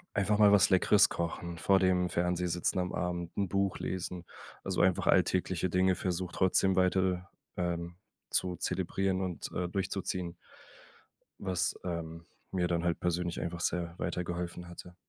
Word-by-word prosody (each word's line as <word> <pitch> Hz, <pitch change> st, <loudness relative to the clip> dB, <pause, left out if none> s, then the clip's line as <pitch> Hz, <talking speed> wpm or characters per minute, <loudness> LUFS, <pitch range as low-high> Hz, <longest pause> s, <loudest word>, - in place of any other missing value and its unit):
einfach 105 Hz, +1 st, +2 dB
mal 105 Hz, -1 st, +7 dB
was 100 Hz, -1 st, +6 dB
Leckeres 95 Hz, +2 st, +5 dB
kochen, 85 Hz, 0 st, -4 dB
vor 95 Hz, +2 st, +4 dB
dem 90 Hz, -1 st, +2 dB
Fernseher 90 Hz, +1 st, 0 dB
sitzen 90 Hz, +2 st, 0 dB
am 90 Hz, 0 st, -2 dB
Abend, 85 Hz, -1 st, -3 dB
'n 100 Hz, -2 st, +1 dB
Buch 100 Hz, +1 st, 0 dB
lesen. 90 Hz, -1 st, -4 dB, 0.4 s
Also -, -, 0 dB
einfach 95 Hz, -1 st, +2 dB
alltägliche 95 Hz, -1 st, +2 dB
Dinge 90 Hz, +1 st, +3 dB
versucht, 90 Hz, 0 st, -3 dB
trotzdem 95 Hz, 0 st, +3 dB
weiter, 95 Hz, 0 st, +1 dB, 0.3 s
ähm, 85 Hz, -1 st, -2 dB, 0.4 s
zu 90 Hz, -1 st, +1 dB
zelebrieren 95 Hz, +1 st, -1 dB
und, 90 Hz, -3 st, -4 dB
äh, 90 Hz, -1 st, -2 dB
durchzuziehen 90 Hz, -2 st, -3 dB, 1.0 s
was, 90 Hz, -2 st, -1 dB
ähm, 85 Hz, -2 st, -5 dB, 0.3 s
mir 90 Hz, -2 st, +1 dB
dann 85 Hz, -1 st, 0 dB
halt 85 Hz, -1 st, 0 dB
persönlich 90 Hz, 0 st, -1 dB
einfach 85 Hz, 0 st, -4 dB
sehr 85 Hz, 0 st, -1 dB
weitergeholfen 85 Hz, 0 st, -3 dB
hatte. 90 Hz, 0 st, -11 dB
90 Hz, 145 wpm, -31 LUFS, 85-95 Hz, 1.0 s, mal